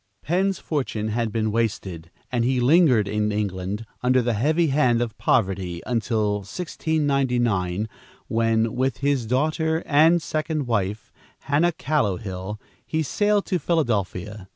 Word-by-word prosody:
Penn's 190 +3 +1
fortune 120 -8 -2
had 115 0 -1
been 110 -1 0
wasted, 100 -7 -2 0.2
and 120 -2 +1
he 130 +1 +1
lingered 130 - +4
in 105 +1 0
England, 100 +1 -3 0.2
under 125 0 +3
the 120 0 0
heavy 155 +9 +2
hand 130 -4 +3
of 115 -3 -2
poverty, 95 -6 0
until 110 -3 0
1699, 120 - -1 0.4
when, 115 0 +1
with 130 +2 0
his 135 -3 0
daughter 155 +6 0
and 160 +4 +5
second 155 -2 -2
wife, 105 -2 -2 0.3
Hannah 150 +5 +2
Callowhill, 105 -9 -2 0.2
he 160 0 -1
sailed 205 +6 +1
to 180 - 0
Philadelphia. 105 - -1
120 Hz, 130 wpm, -24 LUFS, 105-150 Hz, 0.4 s, and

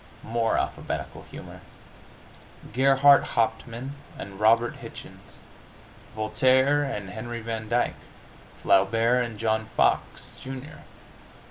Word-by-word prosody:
More 115 0 0
alphabetical - - -4
humor. - - -10 1.1
Gerhart 135 +2 +6
Hauptmann 120 +3 -1 0.2
and 100 0 -8
Robert 115 +2 +3
Hichens; - - -11 0.7
Voltaire 130 +6 +3
and 105 -9 -4
Henry 120 +3 -6
Van 110 -1 -5
Dyke; 120 +1 +1 0.7
Flaubert 115 +6 +3
and 115 -3 -6
John 110 0 0
Fox, - - 0
Jr. 135 +3 -8
115 Hz, 95 wpm, -26 LUFS, 110-130 Hz, 1.1 s, Gerhart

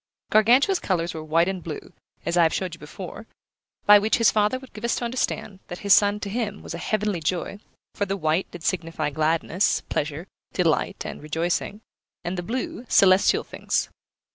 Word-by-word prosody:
Gargantua's 250 - +5
colours 175 -2 -1
were 160 - -6
white 165 +2 +2
and 190 -1 -3
blue, 155 -3 -7 0.3
as 170 - 0
I 175 - +5
have 165 -1 +3
showed 185 -3 -3
you 170 - -9
before, 185 +8 -9 0.6
by 205 0 +9
which 215 +2 +2
his 230 - +5
father 210 +4 +2
would 260 0 -14
give 210 - -10
us 235 - +1
to 240 - -3
understand 235 -5 -2
that 175 - -6
his 200 - +7
son 205 0 +4
to 200 - -4
him 215 -2 -3
was - - -6
a - - -5
heavenly 210 -4 -1
joy; 180 +5 -2 0.3
for 200 - -2
the 195 +1 -1
white 160 +1 0
did 175 -2 -10
signify 165 -4 -1
gladness, 160 +5 +1
pleasure, 150 +3 -2 0.3
delight, 170 -4 0
and - - -6
rejoicing, 170 +7 -2 0.4
and 175 +1 -3
the 175 - -3
blue, 235 +5 -4
celestial 190 0 +5
things. - - -2
185 Hz, 190 wpm, -24 LUFS, 165-210 Hz, 0.6 s, by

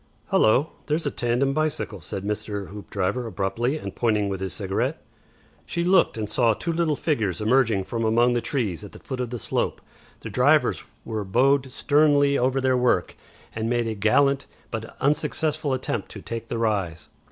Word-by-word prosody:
"Hullo! 130 +8 +4 0.2
Here's 155 +2 0
a 145 - 0
tandem 125 +3 0
bicycle," 155 - -2
said 95 +4 -5
Mr. 105 -1 -3
Hoopdriver, 105 +3 -3
abruptly, 115 +7 -1
and - - -7
pointing 105 -4 +1
with 95 -1 -3
his 95 - -3
cigarette. 95 -2 -2 0.6
She 170 - -2
looked, 180 -7 +3
and 110 -1 -2
saw 115 0 +2
two 170 +8 -2
little 160 -2 +1
figures 110 - -1
emerging 110 -3 +2
from 115 +4 -3
among 120 +2 +3
the 120 - +1
trees 105 - -2
at 105 - -10
the - - -11
foot 130 -2 -6
of 125 -2 -2
the 120 - -4
slope. - - -2 0.4
The - - -7
riders - - +3 0.2
were 110 -2 -3
bowed 130 +6 +2
sternly 145 0 +3
over 130 +1 +2
their 130 -1 +2
work 125 -8 +1 0.4
and 110 +1 -2
made 120 -1 +1
a 110 - -1
gallant 140 +7 +2 0.2
but 115 0 -6
unsuccessful 150 +1 0
attempt 120 -5 -2
to 100 - -8
take 115 0 -5
the 115 - -3
rise. 100 -8 -1
120 Hz, 175 wpm, -24 LUFS, 105-140 Hz, 0.6 s, Hullo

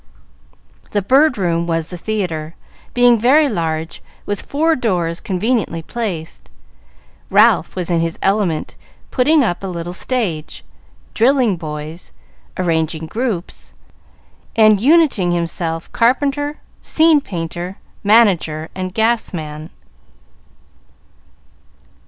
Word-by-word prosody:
The 205 -2 +1
Bird 270 +5 +4
Room 170 -3 0
was 165 -1 -1
the - - -5
theatre, 170 -6 -3 0.4
being 245 -1 +5
very 285 +7 +4
large, 165 - -3 0.2
with 205 -1 -3
four 320 +3 +1
doors 175 - -1
conveniently 190 -3 -1
placed. 185 -7 -5 0.8
Ralph - - +4
was 180 -1 -2
in 170 -1 +2
his 165 0 -2
element, 195 -6 0 0.4
putting 290 +3 +3
up 175 -7 -1
a - - -3
little 175 -1 -5
stage, 180 -8 -3 0.5
drilling 245 -3 +3
boys, 155 0 -7 0.4
arranging 160 -2 -1
groups, 215 -1 -4 0.8
and 215 -3 +5
uniting 265 - +3
in - - +1
himself 165 -1 -3
carpenter, 285 +4 +1 0.2
scene 315 -2 +4
painter, 175 -1 -5 0.3
manager, 190 -8 +3
and 185 -1 -5
gas 225 0 +1
man. 155 0 -7
185 Hz, 105 wpm, -18 LUFS, 165-240 Hz, 0.8 s, being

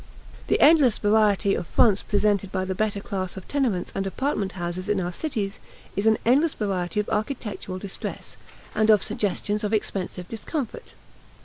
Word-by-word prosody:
The - - +2
endless 290 -7 +6
variety 205 -1 +3
of 175 - -2
fronts 205 -4 +4
presented 205 -2 +1
by 185 -1 -1
the 190 - -2
better 205 +1 -1
class 190 -2 -4
of 190 - -9
tenements 245 -11 0
and 195 0 -2
apartment 205 -3 -1
houses 180 +1 -4
in 210 -2 +2
our 175 -1 -2
cities 210 - -3 0.4
is 200 +3 +1
an 220 - +5
endless 285 +7 +3
variety 190 -3 -1
of 210 - -1
architectural 210 -4 -3
distress 195 0 -7 0.4
and 215 0 +2
of 210 -3 +6
suggestions 210 0 -1
of 210 +1 -1
expensive 185 -4 -2
discomfort. 235 - -5
205 Hz, 165 wpm, -25 LUFS, 190-220 Hz, 0.4 s, endless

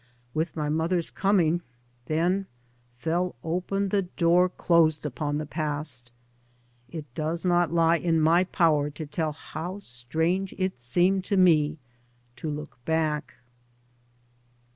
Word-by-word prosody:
With 160 +2 -1
my 150 -2 -1
mother's 165 +3 0
coming 175 -4 +2 0.5
then 180 +5 +1 0.5
fell 170 +7 -1
open 185 +4 -1
the 200 +1 +2
door 180 0 +3
closed 160 -4 +2
upon 145 +1 -2
the 155 - -3
past. 145 -5 -3 0.8
It 160 -3 -6
does 160 +5 -2
not 175 -2 +3
lie 165 0 +4
in 165 -1 +1
my 165 +4 +4
power 155 -5 +2
to 155 +2 -7
tell 155 +1 -2
how 165 +5 -6
strange 160 +6 -2
it 185 -7 -1
seemed 175 +10 +2
to 200 - 0
me 160 -4 +4 0.6
to 160 - -4
look 145 -5 -7
back. 155 0 -1
165 Hz, 125 wpm, -27 LUFS, 150-180 Hz, 0.8 s, lie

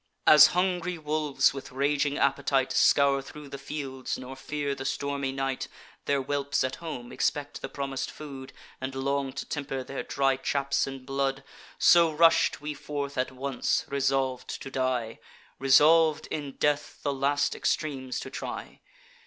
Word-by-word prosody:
"As 150 - +9
hungry 180 -1 0
wolves, 150 -3 +1
with 135 -1 -8
raging 145 +2 0
appetite, 135 -1 +1
Scour 140 -1 +4
thro' 145 +2 -11
the 140 0 -8
fields, 135 -2 -5
nor 130 +1 -8
fear 145 +1 -3
the 135 - -6
stormy 140 0 -2
night; 135 -1 -2 0.4
Their 140 -1 +1
whelps 140 +1 0
at 130 - -2
home 145 -8 -7
expect 145 -1 -2
the - - -5
promis'd 135 -2 -4
food, 135 -3 -9 0.3
And 130 0 -4
long 140 0 -1
to - - -5
temper 135 -2 -4
their 135 +1 -5
dry 135 -1 +1
chaps 140 +1 0
in 135 -1 -7
blood: 135 0 -1 0.3
So 170 -2 +6
rush'd 165 +2 +4
we 150 0 -4
forth 140 -1 -5
at 130 -1 -1
once; 130 0 -1
resolv'd 135 -2 0 0.2
to 135 - -8
die, 130 -4 -1 0.4
Resolv'd, 155 +3 +5
in 145 -3 -4
death, 145 +1 -1
the 145 - 0
last 140 +1 +1
extremes 135 -4 -2
to - - -8
try. - - -6
140 Hz, 155 wpm, -28 LUFS, 135-145 Hz, 0.4 s, As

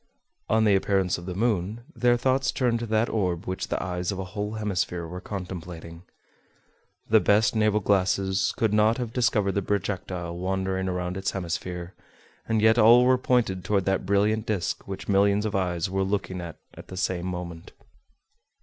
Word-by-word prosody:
On 110 0 +3
the 105 -2 +4
appearance 95 -2 +1
of 85 - -10
the 90 - -4
moon, 105 0 0
their 120 0 +3
thoughts 130 +2 +1
turned 120 -3 0
to 120 - -4
that 110 +1 +2
orb 90 -6 -1
which 95 +1 -3
the - - -2
eyes 90 0 -2
of 100 - -4
a 95 - -3
whole 105 +1 -3
hemisphere 95 -5 -2
were 90 +2 -7
contemplating. 90 -4 -7 1.1
The 110 - +5
best 105 +2 +3
naval 105 -1 +2
glasses 95 0 +1
could 110 -2 +1
not 110 +2 +3
have 120 -3 -4
discovered 115 -6 +2
the 100 - -1
projectile 95 -3 -3
wandering 95 +1 -2
around 90 0 -3
its 95 0 -1
hemisphere, 90 0 -4 0.5
and 110 -1 +1
yet 110 +2 +5
all 120 +3 +7
were 130 0 +4
pointed 115 -8 +1
toward 100 0 0
that 95 -1 0
brilliant 105 +2 +1
disc 100 -5 -2
which 95 -1 -6
millions 100 +1 +3
of 105 - -2
eyes 90 -3 0
were 95 +1 -1
looking 95 -2 -2
at 85 -2 -8 0.2
at - - -12
the 95 - -9
same 90 -1 -1
moment. 90 -2 -6
95 Hz, 175 wpm, -26 LUFS, 90-110 Hz, 1.1 s, all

